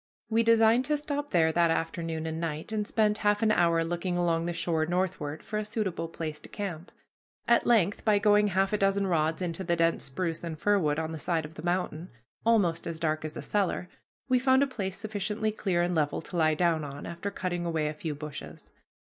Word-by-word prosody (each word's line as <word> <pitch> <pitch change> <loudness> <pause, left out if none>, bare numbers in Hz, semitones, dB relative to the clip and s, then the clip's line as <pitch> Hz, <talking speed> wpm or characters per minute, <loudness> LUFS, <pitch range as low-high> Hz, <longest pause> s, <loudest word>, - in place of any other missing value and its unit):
We 225 +1 +4
designed 230 +2 +4
to 300 0 +1
stop 290 0 -3
there 160 -3 +3
that 170 +1 +3
afternoon 165 -1 -2
and 160 0 -3
night, 160 +2 -4
and 210 -1 -1
spent 210 -1 +2
half 205 +1 +2
an 215 - +4
hour 170 -4 +3
looking 175 +2 -2
along 170 -1 +1
the - - 0
shore 160 -2 0
northward 175 -4 -2
for 215 - -3
a - - -2
suitable 190 -6 -2
place 160 -2 -5
to - - -12
camp. 180 -5 -5 0.6
At 235 0 +4
length, 205 -5 +3
by 210 -2 +4
going 210 0 +4
half 195 +1 +1
a 210 - +1
dozen 195 0 +2
rods 160 -1 0
into 175 +1 -3
the 170 -1 +1
dense 165 0 +1
spruce 165 +4 -3
and 165 -2 -5
fir 205 +5 +2
wood 150 -4 +1
on 160 0 -2
the 160 - -5
side 165 0 0
of 150 - -10
the 155 - -9
mountain 175 -1 -2 0.3
almost 190 -8 +2
as 165 -1 -4
dark 155 -1 -1
as 155 -1 -5
a - - -5
cellar, 190 -3 -1 0.4
we 255 -1 +3
found 260 +1 +4
a - - +3
place 195 -8 -4
sufficiently 215 +1 -2
clear 185 -5 0
and 175 +1 0
level 150 -3 0
to - - -9
lie 155 -2 +3
down 165 -1 +1
on, 140 -1 -7
after 170 +4 -4
cutting 180 -3 -3
away 160 -3 0
a 150 - -2
few 155 0 -4
bushes. 150 - -9
175 Hz, 220 wpm, -28 LUFS, 160-205 Hz, 0.6 s, We